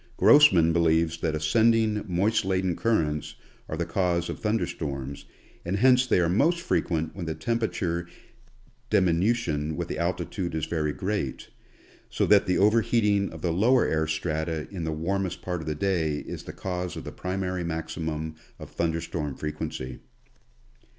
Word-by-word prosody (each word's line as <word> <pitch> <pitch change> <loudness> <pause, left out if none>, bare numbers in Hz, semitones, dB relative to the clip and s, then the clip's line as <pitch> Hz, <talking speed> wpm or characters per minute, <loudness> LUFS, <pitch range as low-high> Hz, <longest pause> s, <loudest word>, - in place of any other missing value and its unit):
Grossman 90 - +6
believes 80 -1 +2
that 80 -2 -1
ascending 110 +7 +2
moist 100 +5 +1
laden 95 -2 0
currents 80 -7 0 0.3
are 80 - -3
the 85 - -1
cause 85 -1 0
of - - -7
thunder 105 -3 0
storms, 70 -3 -5 0.4
and 90 +3 -1
hence 125 +3 +5
they 95 - +3
are 85 - +3
most 150 - +2
frequent 80 - -1
when 90 -4 -5
the 80 - -2
temperature 85 -3 -2 0.8
diminution 90 -5 +1
with - - -4
altitude 85 +1 -2
is 80 -1 -1
very 75 -3 -1
great, 95 -5 -3 0.6
so - - 0
that 105 -1 +5
the 90 - +2
over 105 +4 +4
heating 105 -3 +2
of 80 -1 -11
the 85 -2 +1
lower 120 +8 +4
air 80 0 0
strata 80 0 -2
in 90 -5 -4
the 80 - -1
warmest 90 +4 -2
part 90 -2 -3
of 80 - -9
the 75 - -1
day 80 -3 0
is - - -8
the - - -6
cause 90 -2 -4
of - - -6
the - - -7
primary 90 -1 -3
maximum 80 -1 -4 0.2
of - - -10
thunder 85 -1 -1
storm 75 -4 -4
frequency. 65 -4 -5
85 Hz, 160 wpm, -26 LUFS, 80-100 Hz, 0.8 s, Grossman